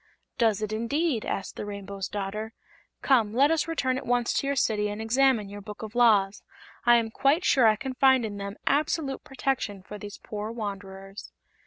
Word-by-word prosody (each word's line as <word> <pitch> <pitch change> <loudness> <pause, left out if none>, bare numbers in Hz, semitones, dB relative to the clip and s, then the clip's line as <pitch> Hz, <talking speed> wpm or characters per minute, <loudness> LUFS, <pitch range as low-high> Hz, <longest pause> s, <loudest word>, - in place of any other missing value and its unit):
"Does 220 -3 +2
it, 215 0 -3
indeed?" 245 +3 0
asked 195 - -4
the - - -4
Rainbow's 200 -1 -5
Daughter. 210 +2 -4 0.5
"Come, 230 -6 +3
let 280 +5 +5
us 325 -1 +1
return 260 -6 0
at - - -11
once 245 -1 +1
to 275 - 0
your 280 - 0
City 210 -5 +1
and 205 +1 -5
examine 230 -1 +2
your 205 +1 -8
Book 210 +2 -9
of 215 0 -7
Laws. 210 -5 +3 0.5
I 240 - +8
am 230 -1 +1
quite 280 +9 +2
sure 255 -5 +5
I 215 - +5
can 260 +5 -5
find 260 -2 +4
in 205 -2 -5
them 200 0 -5
absolute 290 -1 0
protection 255 -8 -2
for 210 +2 -9
these 205 0 -8
poor 210 0 -6
wanderers." 195 -3 -7
220 Hz, 190 wpm, -27 LUFS, 205-265 Hz, 0.5 s, I